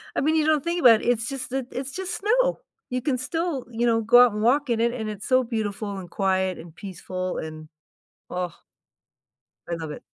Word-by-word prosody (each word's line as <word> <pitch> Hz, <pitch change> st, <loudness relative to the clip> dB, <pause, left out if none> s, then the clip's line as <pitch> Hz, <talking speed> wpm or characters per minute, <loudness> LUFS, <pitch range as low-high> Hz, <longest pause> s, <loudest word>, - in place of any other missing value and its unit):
I -, -, +1 dB
mean, 310 Hz, +3 st, +2 dB
you 310 Hz, -1 st, +3 dB
don't 310 Hz, -3 st, +3 dB
think 340 Hz, +1 st, -1 dB
about 235 Hz, -7 st, +7 dB
it. -, -, -6 dB
It's 235 Hz, -1 st, +1 dB
just 270 Hz, -2 st, -5 dB
that 265 Hz, -1 st, -2 dB
it's 265 Hz, +1 st, -4 dB
just 370 Hz, +3 st, -4 dB
snow. -, -, +2 dB, 0.3 s
You 255 Hz, -1 st, -2 dB
can 265 Hz, -1 st, 0 dB
still, 320 Hz, +1 st, -2 dB
you 235 Hz, +1 st, 0 dB
know, 225 Hz, -1 st, +3 dB
go 245 Hz, +3 st, +7 dB
out 245 Hz, -, +1 dB
and 210 Hz, -, -3 dB
walk 270 Hz, +5 st, +3 dB
in 235 Hz, -1 st, +1 dB
it, 235 Hz, +1 st, +2 dB
and 220 Hz, -3 st, -4 dB
it's 210 Hz, -1 st, -6 dB
so 255 Hz, -1 st, +4 dB
beautiful, 215 Hz, -3 st, -3 dB
and 180 Hz, -2 st, -8 dB
quiet, 190 Hz, 0 st, 0 dB
and 165 Hz, 0 st, -12 dB
peaceful, 185 Hz, -1 st, -5 dB
and 155 Hz, 0 st, -7 dB, 0.6 s
ah 180 Hz, -1 st, -4 dB, 1.1 s
I 170 Hz, -, -1 dB
love 160 Hz, -2 st, -6 dB
it. -, -, -8 dB
235 Hz, 220 wpm, -25 LUFS, 190-275 Hz, 1.1 s, about